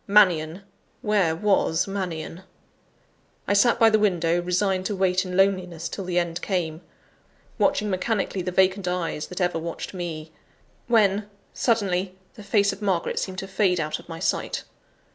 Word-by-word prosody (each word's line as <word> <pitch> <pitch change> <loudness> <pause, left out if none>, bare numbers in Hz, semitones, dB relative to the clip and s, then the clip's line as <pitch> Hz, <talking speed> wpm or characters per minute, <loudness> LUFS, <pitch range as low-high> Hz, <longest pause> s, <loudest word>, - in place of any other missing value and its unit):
Mannion! 185 -4 +4 0.4
where 200 -6 +2
was 185 -3 +2
Mannion?) 180 -3 -4 1.1
I - - +2
sat 235 +4 +4
by 225 -1 +6
the 215 - +4
window, 175 -4 +2
resigned 185 +1 0
to 210 - -2
wait 185 0 +1
in 180 0 -4
loneliness 185 -4 +1
till 195 - -6
the 180 -1 -2
end 175 0 -1
came, 170 -4 -2 0.8
watching 210 - +2
mechanically 195 0 -1
the 180 - -3
vacant 190 +1 +2
eyes 180 -4 -2
that 180 - -7
ever 175 -2 +1
watched 170 +3 -6
me 165 -4 -5 0.6
when, 210 -3 +3 0.2
suddenly, 190 -6 0 0.2
the - - -12
face 200 -1 +2
of 195 - -11
Margaret 190 -4 0
seemed 190 -1 -4
to 195 - -4
fade 190 -2 +1
out 155 -1 -2
of - - -16
my 165 - -6
sight. - - -1
185 Hz, 160 wpm, -25 LUFS, 175-200 Hz, 1.1 s, by